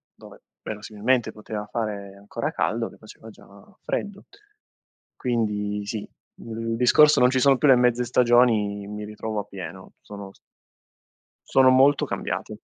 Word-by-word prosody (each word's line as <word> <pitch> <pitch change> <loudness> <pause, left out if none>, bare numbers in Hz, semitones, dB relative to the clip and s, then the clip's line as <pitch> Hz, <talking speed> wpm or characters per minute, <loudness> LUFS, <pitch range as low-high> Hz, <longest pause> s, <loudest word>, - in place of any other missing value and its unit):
dove - - -15 0.2
verosimilmente 110 +3 -1
poteva 105 -1 -7
fare 100 -4 -4
ancora 100 +1 -4
caldo, - - -1
che - - -17
faceva - - -14
già - - -17 0.4
freddo. 205 -1 -4 0.9
Quindi 105 -4 -2
sì, 105 +1 -4 0.4
il 115 0 -5
discorso 150 +5 +5
non 125 - +5
ci 130 0 +1
sono 135 0 +4
più 150 - +3
le 135 - +8
mezze 125 0 +2
stagioni 115 -5 +2
mi 105 0 -6
ritrovo 105 0 -5
appieno 95 -2 -8
sono 100 -1 -10
s - - -25 1.1
sono 130 -1 +5
molto 135 +2 +4
cambiati. - - -5
110 Hz, 135 wpm, -24 LUFS, 105-125 Hz, 1.1 s, le